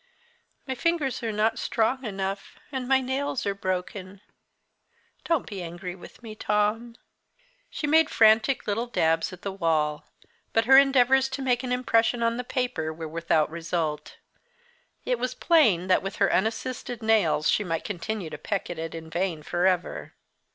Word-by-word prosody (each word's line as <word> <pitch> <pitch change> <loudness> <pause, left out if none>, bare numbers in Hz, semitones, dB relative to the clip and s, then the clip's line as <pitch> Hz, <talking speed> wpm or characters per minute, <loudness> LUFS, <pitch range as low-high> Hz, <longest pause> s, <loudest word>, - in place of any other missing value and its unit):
My 265 - -3
fingers 295 -1 -1
are 225 -2 -2
not 215 +2 0
strong 250 +4 0
enough, 195 -2 -4
and 260 -3 -4
my 265 0 +4
nails 265 +1 -2
are 200 - 0
broken 185 0 -4 1.0
don't 330 -5 +1
be 195 -3 -6
angry 175 +1 -6
with 190 +6 -14
me, 220 -2 -8
Tom." 215 +2 -1 0.7
She - - -4
made 320 +1 +4
frantic 220 +4 +4
little 225 +4 -1
dabs 165 -7 +1
at 185 - -12
the 200 - -3
wall. 155 -5 0 0.5
But 225 0 +3
her 265 +2 +7
endeavours 265 -1 +5
to 265 +1 -4
make 250 -2 +1
an 255 -1 -4
impression 240 -1 +2
on 230 0 +1
the 250 - -3
paper 245 -12 -2
were 160 0 -7
without 160 -1 0
result. 165 -2 -3 0.9
It - - 0
was - - -2
plain 225 - +3
that 185 -1 +3
with 195 +1 -5
her - - +2
unassisted 235 +1 -2
nails 210 -9 +2
she 210 - +2
might 165 -4 -3
continue 200 -2 -4
to - - -7
peck 200 -4 -3
at 170 - -6
it 165 0 -5
in 160 0 -8
vain 170 -1 -2
for 175 +4 +1
ever. 180 -1 -2
215 Hz, 165 wpm, -26 LUFS, 175-250 Hz, 1.0 s, her